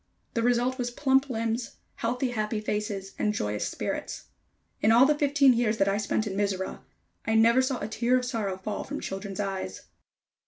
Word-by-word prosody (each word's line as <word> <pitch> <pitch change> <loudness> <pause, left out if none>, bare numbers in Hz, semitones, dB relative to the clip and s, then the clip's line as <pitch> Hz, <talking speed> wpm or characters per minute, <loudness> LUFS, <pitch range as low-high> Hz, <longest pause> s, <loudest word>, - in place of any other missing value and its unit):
The 230 - 0
result 245 +2 +1
was 245 -1 -1
plump 270 +2 +2
limbs, 230 0 -2 0.2
healthy, 250 +2 -1
happy 215 -1 -1
faces 210 -2 -3
and 210 0 +1
joyous 105 - -1
spirits. - - -4 0.5
In 215 - +4
all 240 +3 +7
the 300 - +4
fifteen 285 -2 +4
years 230 -2 +1
that 195 - +2
I 200 +1 +2
spent 210 +1 0
in 200 -2 -4
Mizora, 195 -2 -1 0.5
I 220 - +2
never 230 +3 +5
saw 260 -1 -1
a - - -3
tear 235 +3 +2
of 250 - -1
sorrow 215 -7 -2
fall 205 +2 -4
from 290 +1 -5
children's 195 0 -5
eyes. 190 - -3
225 Hz, 185 wpm, -27 LUFS, 200-250 Hz, 0.5 s, all